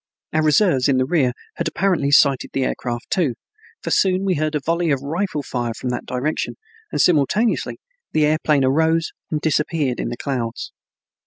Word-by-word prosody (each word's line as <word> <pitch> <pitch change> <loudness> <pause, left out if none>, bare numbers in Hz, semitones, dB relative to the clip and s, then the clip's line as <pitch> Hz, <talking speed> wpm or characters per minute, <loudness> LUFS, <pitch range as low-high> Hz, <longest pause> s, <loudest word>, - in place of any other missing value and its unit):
Our 155 - +2
reserves 155 -4 +3
in 135 - +3
the 130 - +2
rear 135 -4 +2 0.3
had 170 - -1
apparently 165 -4 +1
sighted 140 -2 +3
the 135 - 0
air - - 0
craft 120 -1 -5
too, 155 -11 +1 0.5
for - - -3
soon 190 0 +2
we 190 - +2
heard 155 -1 -1
a - - +1
volley 165 +3 0
of 140 -2 0
rifle 160 0 -2
fire 120 -3 -3
from 125 - -4
that 125 - -4
direction 130 +5 -2 0.4
and - - -2
simultaneously 180 - +2 0.3
the 155 -1 +3
aeroplane 150 -2 +2
arose 160 +4 +2 0.2
and 155 - -1
disappeared 150 -4 0
in - - -2
the 120 - -5
clouds. 120 -5 -3
150 Hz, 180 wpm, -21 LUFS, 130-165 Hz, 0.5 s, reserves